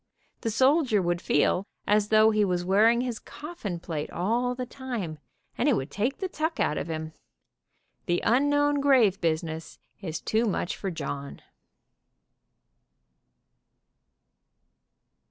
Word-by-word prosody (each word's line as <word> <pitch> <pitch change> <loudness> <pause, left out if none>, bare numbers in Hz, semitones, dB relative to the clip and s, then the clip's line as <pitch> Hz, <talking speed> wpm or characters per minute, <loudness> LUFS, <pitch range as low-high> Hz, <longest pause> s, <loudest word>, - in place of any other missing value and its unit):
The 225 - -2
soldier 260 0 +3
would 175 -1 0
feel 180 +6 +1 0.2
as 210 0 +3
though 215 +1 +5
he 215 -1 +2
was 180 -2 0
wearing 220 +5 +4
his 245 -3 -3
coffin 295 - -7
plate 160 -3 -4
all 235 +7 0
the 250 0 -4
time, 240 - -5 0.4
and 280 - +3
it 265 - +4
would 135 - -3
take 235 +7 -1
the 380 - -2
tuck 320 -2 -3
out 150 - +1
of - - -3
him. 160 -1 -5 0.9
The 175 0 +2
unknown 290 +3 +3
grave 245 -9 +4
business 160 -1 -2 0.2
is 165 -4 -4
too 225 +2 0
much 195 -3 -1
for 195 - -4
John." 140 -5 -6
215 Hz, 130 wpm, -27 LUFS, 175-255 Hz, 0.9 s, though